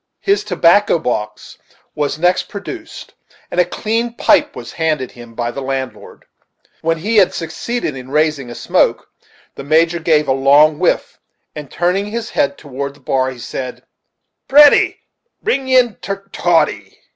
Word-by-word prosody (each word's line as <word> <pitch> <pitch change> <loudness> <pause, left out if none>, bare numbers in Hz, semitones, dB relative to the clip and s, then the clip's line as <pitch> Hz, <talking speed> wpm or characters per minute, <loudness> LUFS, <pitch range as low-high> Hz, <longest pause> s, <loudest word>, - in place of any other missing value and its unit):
His 400 +1 +1
tobacco 180 +2 +3
box 105 -8 -4 0.3
was 150 0 -2
next 175 +3 +1
produced, 320 - -9 0.4
and 180 - -1
a - - +6
clean 225 +6 -2
pipe - - +2
was - - -9
handed 155 -6 -1
him 120 -1 -13
by 120 0 -2
the 140 - -6
landlord. 130 -1 -6 0.6
When 165 0 0
he 215 +7 -1
had 195 -3 +4
succeeded 170 - -4
in 130 0 -9
raising 150 -3 0
a 120 - -8
smoke, - - 0 0.4
the - - -9
Major 165 +4 +2
gave 155 -2 +2
a - - +2
long 145 +3 +4
whiff, - - 0 0.4
and, 150 -3 -8
turning 180 +4 0
his 230 +2 -5
head 285 -1 0
toward 140 -1 -6
the - - -20
bar, 130 0 0
he 130 - -9
said: 125 +1 -6 0.6
"Petty, 290 +1 +5 0.4
pring 275 - -1
in 250 -3 +4
ter 195 0 -5
toddy." 175 -2 0
160 Hz, 155 wpm, -17 LUFS, 135-205 Hz, 0.6 s, a